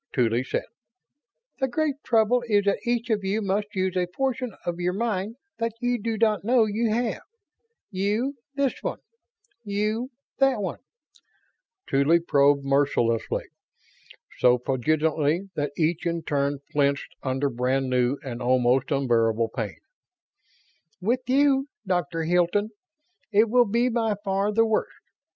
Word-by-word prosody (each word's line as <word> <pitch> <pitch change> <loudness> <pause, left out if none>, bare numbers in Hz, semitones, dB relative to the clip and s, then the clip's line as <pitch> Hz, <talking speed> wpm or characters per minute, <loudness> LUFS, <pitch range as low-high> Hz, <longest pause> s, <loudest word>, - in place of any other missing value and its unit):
Tuly 120 -1 +2
said: - - -2 1.0
"The 265 - +1
great 290 +2 -1
trouble 235 +1 +3
is 205 -2 +2
that 200 - +2
each 235 -1 0
of 210 -2 0
you 195 +3 0
must 205 0 -1
use 185 -1 0
a 180 -1 +1
portion 255 +4 -2
of 175 0 -3
your 180 +1 0
mind 215 0 -2 0.2
that 230 -1 -1
you 245 -2 0
do 225 +1 -2
not 215 -2 +2
know 235 +1 +4
you 220 +2 0
have. 235 +1 -1 0.7
You, 210 +8 -1 0.2
this 280 -2 +1
one. - - -3 0.7
You, 215 +4 -1 0.3
that 270 -4 +3
one." 190 -4 -3 1.1
Tuly 145 +5 +3
probed 140 -3 +3
mercilessly; 135 -5 +1 1.0
so 125 0 +5
poignantly 155 +7 0
that 145 0 -2
each 165 +1 0
in 170 -1 -2
turn 140 -1 0 0.2
flinched 140 -1 0
under 135 +1 -1
brand 130 +3 0
new 125 +1 +1
and 125 -3 -6
almost 125 +1 +2
unbearable 115 -5 +1
pain. 110 -5 -3 1.2
"With 235 +7 0
you, 270 +1 +3 0.2
Doctor 170 -3 -1
Hilton, 180 +5 +1 0.6
it 215 +1 +4
will 245 0 +5
be 235 +4 +2
by 225 -3 0
far 195 +1 +1
the 225 +2 +3
worst. 220 -1 -1
190 Hz, 135 wpm, -25 LUFS, 140-225 Hz, 1.2 s, so